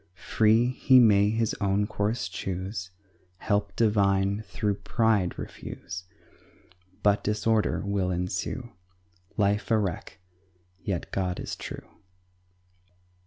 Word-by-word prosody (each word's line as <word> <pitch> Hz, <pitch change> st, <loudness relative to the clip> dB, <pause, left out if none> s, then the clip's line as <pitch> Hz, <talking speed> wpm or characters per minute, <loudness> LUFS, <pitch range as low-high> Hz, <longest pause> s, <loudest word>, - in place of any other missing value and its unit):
Free, 110 Hz, +5 st, +3 dB
he 130 Hz, 0 st, +5 dB
may 105 Hz, -3 st, +5 dB
his 110 Hz, 0 st, 0 dB
own 100 Hz, +1 st, +2 dB
course 105 Hz, 0 st, -1 dB
choose, 95 Hz, +1 st, -4 dB, 0.5 s
Help 100 Hz, +2 st, -1 dB
divine 100 Hz, -2 st, +2 dB
through 105 Hz, -2 st, -1 dB
pride 105 Hz, -2 st, +1 dB
refuse, 90 Hz, +1 st, -7 dB, 1.0 s
But 105 Hz, 0 st, +3 dB
disorder 105 Hz, +1 st, +1 dB
will 100 Hz, -2 st, 0 dB
ensue 90 Hz, +7 st, -3 dB, 0.7 s
Life 105 Hz, 0 st, +1 dB
a 115 Hz, -, +4 dB
wreck! 95 Hz, -5 st, -3 dB, 0.7 s
Yet 95 Hz, -4 st, -3 dB
God 90 Hz, -2 st, -2 dB
is -, -, -4 dB
true. -, -, -8 dB
100 Hz, 105 wpm, -27 LUFS, 95-110 Hz, 1.0 s, he